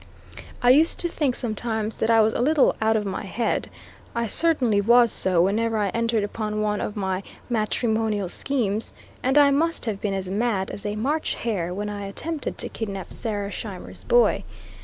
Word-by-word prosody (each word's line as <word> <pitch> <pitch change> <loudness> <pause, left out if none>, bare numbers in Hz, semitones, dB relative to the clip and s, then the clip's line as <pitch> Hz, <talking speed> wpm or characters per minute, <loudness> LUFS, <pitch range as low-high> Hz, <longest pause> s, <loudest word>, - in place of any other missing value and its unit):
I 245 - +7
used 310 +5 +5
to 345 - +2
think 290 -6 -1
sometimes 220 -1 -3
that 220 - 0
I 225 -1 +6
was 220 +1 +2
a - - -1
little 295 +2 +3
"out 220 0 +3
of 210 - -2
my 195 -1 -3
head;" 225 +4 -2 0.5
I 235 0 0
certainly 245 -6 +3
was 235 +2 +5
so 180 -2 +4
whenever 220 +4 +1
I 205 -2 +1
entered 230 0 0
upon 215 +1 -3
one 210 -1 -1
of 205 - -4
my 190 -2 -2 0.3
matrimonial 220 -2 0
schemes, 220 0 -2 0.3
and 265 +3 +1
I 285 -1 +6
must 330 +3 0
have 210 -4 -3
been 200 -2 -1
as 190 -1 -2
mad 200 -1 -1
as 205 - -5
a 205 - -3
March 285 +9 -1
hare 190 -7 -2
when 205 +3 -4
I 205 -1 -5
attempted 310 +9 -5
to - - -4
kidnap 195 -4 -6
Sarah 205 -3 -4
Scheimer's 200 -4 -7
boy. 485 0 +3
220 Hz, 185 wpm, -24 LUFS, 205-245 Hz, 0.5 s, I